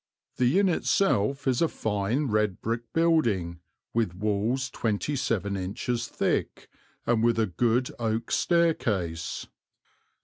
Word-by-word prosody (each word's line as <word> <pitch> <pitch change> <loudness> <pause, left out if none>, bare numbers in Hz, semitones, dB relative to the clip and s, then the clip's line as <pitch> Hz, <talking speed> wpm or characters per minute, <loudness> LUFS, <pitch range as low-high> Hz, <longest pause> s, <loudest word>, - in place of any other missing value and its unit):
The 125 +7 +3
inn 200 0 +4
itself 140 - +1
is 130 -2 +2
a 165 - +4
fine 110 +3 -1
red 105 -5 0
brick 115 +1 -3
building, 115 - +1 0.3
with 110 -7 0
walls 110 +6 -1
twenty 115 +6 -1
seven 100 -6 -1
inches 110 +6 -2
thick, - - -1 0.4
and 115 -2 +2
with 115 -1 +3
a 110 - +3
good 120 +7 +1
oak 115 0 -1
staircase." 110 - 0
115 Hz, 125 wpm, -27 LUFS, 100-130 Hz, 0.4 s, inn